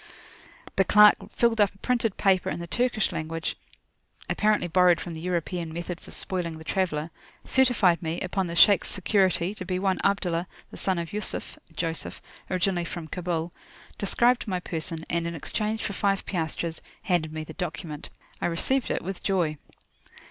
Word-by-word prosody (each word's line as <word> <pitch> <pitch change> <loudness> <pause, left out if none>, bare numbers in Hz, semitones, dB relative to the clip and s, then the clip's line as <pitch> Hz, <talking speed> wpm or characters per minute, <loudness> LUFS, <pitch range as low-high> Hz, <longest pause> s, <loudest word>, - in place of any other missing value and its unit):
The 195 - +6
clerk 210 +1 +8 0.2
filled 230 -2 +3
up 200 -1 +3
a - - -19
printed 235 -1 0
paper 190 -2 +3
in - - -3
the 170 - -5
Turkish 240 +3 +1
language, 160 +1 -3 0.8
apparent1y 210 -6 +1
borrowed 180 -2 +5
from 175 - -6
the 160 - -7
European 175 -1 -2
method 170 +1 -5
for - - -14
spoiling 175 -4 -2
the 160 - -10
traveller; 165 -3 -1 0.3
certified 235 -10 +3
me, 165 +1 -2
upon 185 0 -1
the 170 - -5
Shaykh's 200 +3 +6
security, 190 -1 +1
to 210 - -7
be 185 0 -2
one 190 0 +1
Abdullah, 180 -3 +1 0.2
the - - -9
son 190 -2 0
of 170 +1 -4
Yusuf 210 0 -3 0.2
(Joseph), 165 0 -2 0.3
originally 185 -1 +1
from 165 -1 -6
Kabul, 170 -1 -2 0.5
described 240 +4 +2
my 185 -3 -1
person, 165 -1 -3
and, 170 0 -1
in 170 - -4
exchange 215 +7 -2
for 200 - -2
five 195 0 0
piastres, 165 -2 -2 0.2
handed 175 -4 +1
me 155 0 -4
the 160 - -9
document. 165 -4 -5 0.3
I - - +1
received 235 +10 0
it - - -1
with 190 +1 -5
joy. 170 -7 0
180 Hz, 170 wpm, -27 LUFS, 165-200 Hz, 0.8 s, clerk